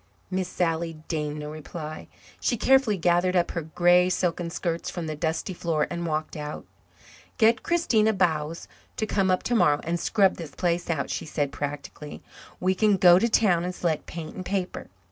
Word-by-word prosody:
Miss 185 Hz, -1 st, -1 dB
Sally 165 Hz, -2 st, -1 dB
deigned 150 Hz, -2 st, -2 dB
no 150 Hz, 0 st, -6 dB
reply. 155 Hz, 0 st, -7 dB, 0.3 s
She 240 Hz, -, 0 dB
carefully 265 Hz, -4 st, +3 dB
gathered 175 Hz, +1 st, +2 dB
up 175 Hz, -1 st, +2 dB
her 170 Hz, -, -2 dB
grey 175 Hz, +3 st, +3 dB
silken 175 Hz, -2 st, -1 dB
skirts 170 Hz, 0 st, -3 dB
from 175 Hz, -2 st, -5 dB
the 155 Hz, -1 st, -4 dB
dusty 160 Hz, +4 st, -2 dB
floor 165 Hz, -3 st, 0 dB
and 170 Hz, 0 st, -3 dB
walked 155 Hz, +1 st, -2 dB
out. 150 Hz, -1 st, -6 dB, 0.7 s
"Get 230 Hz, +1 st, +4 dB
Christina 235 Hz, -11 st, +2 dB
Bowes 165 Hz, -5 st, -1 dB, 0.3 s
to 220 Hz, -, 0 dB
come 195 Hz, -3 st, +1 dB
up 185 Hz, -, +1 dB
tomorrow 150 Hz, -12 st, +3 dB
and 170 Hz, +1 st, -1 dB
scrub 195 Hz, +1 st, +2 dB
this 165 Hz, -4 st, -8 dB
place 175 Hz, -1 st, -1 dB
out," 155 Hz, -4 st, -1 dB
she -, -, -4 dB
said 145 Hz, -2 st, -1 dB
practically. 145 Hz, +1 st, -6 dB, 0.4 s
"We 185 Hz, +1 st, +2 dB
can 205 Hz, +1 st, +3 dB
go 180 Hz, -1 st, +7 dB
to 235 Hz, -, +1 dB
town 185 Hz, -7 st, +3 dB
and 180 Hz, 0 st, -3 dB
select 165 Hz, -4 st, -1 dB
paint 160 Hz, -2 st, -7 dB
and 185 Hz, -, -5 dB
paper. 185 Hz, 0 st, -3 dB
175 Hz, 180 wpm, -26 LUFS, 155-185 Hz, 0.7 s, go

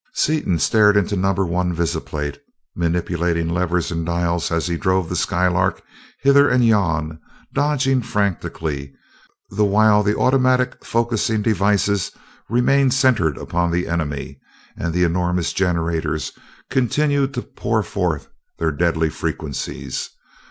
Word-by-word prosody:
Seaton 150 Hz, -, +1 dB
stared 105 Hz, +3 st, +4 dB
into 100 Hz, +1 st, +1 dB
number 95 Hz, 0 st, +1 dB
one 90 Hz, 0 st, -1 dB
visiplate, 75 Hz, -3 st, -3 dB, 0.4 s
manipulating 85 Hz, 0 st, 0 dB
levers 90 Hz, 0 st, -1 dB
and 85 Hz, -1 st, -2 dB
dials 85 Hz, 0 st, -1 dB
as 80 Hz, 0 st, 0 dB
he 85 Hz, -1 st, -1 dB
drove 95 Hz, -1 st, 0 dB
the 90 Hz, -, -2 dB
Skylark 90 Hz, +1 st, +1 dB, 0.4 s
hither 140 Hz, +1 st, +5 dB
and 125 Hz, -1 st, +3 dB
yon, 80 Hz, -8 st, +1 dB, 0.3 s
dodging 135 Hz, -3 st, +1 dB
frantically, 80 Hz, -, -3 dB, 0.6 s
the 105 Hz, +2 st, +1 dB
while 105 Hz, +1 st, +4 dB
the 105 Hz, 0 st, 0 dB
automatic 130 Hz, -1 st, +2 dB
focusing 115 Hz, -2 st, 0 dB
devices 100 Hz, -2 st, +1 dB, 0.4 s
remained 130 Hz, +3 st, +3 dB
centered 120 Hz, -, +2 dB
upon 85 Hz, 0 st, -1 dB
the 85 Hz, +1 st, -1 dB
enemy 75 Hz, -5 st, -3 dB, 0.4 s
and 85 Hz, -, -3 dB
the 90 Hz, +2 st, +1 dB
enormous 90 Hz, 0 st, 0 dB
generators 85 Hz, -4 st, -1 dB, 0.4 s
continued 140 Hz, +2 st, +1 dB
to 125 Hz, -, -3 dB
pour 110 Hz, -2 st, -2 dB
forth 85 Hz, -7 st, -2 dB, 0.3 s
their 80 Hz, -1 st, 0 dB
deadly 80 Hz, +1 st, 0 dB
frequencies. 75 Hz, -2 st, -4 dB
90 Hz, 125 wpm, -20 LUFS, 85-110 Hz, 0.6 s, hither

